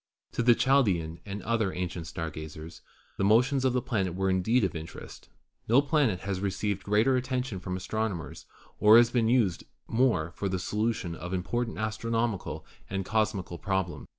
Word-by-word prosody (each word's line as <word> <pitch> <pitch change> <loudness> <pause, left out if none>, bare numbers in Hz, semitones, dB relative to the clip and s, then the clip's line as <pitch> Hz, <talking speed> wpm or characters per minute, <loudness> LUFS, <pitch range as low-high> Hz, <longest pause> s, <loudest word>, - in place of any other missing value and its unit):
To - - -1
the 120 0 +6
Chaldean 95 -14 +2
and 100 +1 -5
to - - -13
other 115 -4 +1
ancient 90 -2 -4
star 80 -1 -4
gazers 80 +1 -9 0.4
the - - -1
mo 105 +3 +6
tions 135 0 -1
of 130 -2 +2
the 125 - 0
planet 95 -7 -1
were 95 0 +1
indeed 110 +6 +2
of 95 - -1
interest. 80 0 -9 0.4
No 120 +4 +6
planet 140 - +1
has 95 -1 -3
received 100 0 -2
greater 110 +7 +2
attention 125 -5 -2
from 90 0 -4
astronomers 100 -2 -4 0.3
or 105 +2 +8
has 120 0 +5
been 115 -3 +2
used 115 -8 +2 0.2
more 115 -10 +1
for 100 - -3
the 95 - -1
solution 105 -2 -1
of 90 +3 -5
important 115 +6 -2
astronomical 110 0 -2 0.2
and 95 -1 -3
cosmical 105 -5 -1
problems. 95 -3 -2
100 Hz, 175 wpm, -28 LUFS, 90-115 Hz, 0.4 s, or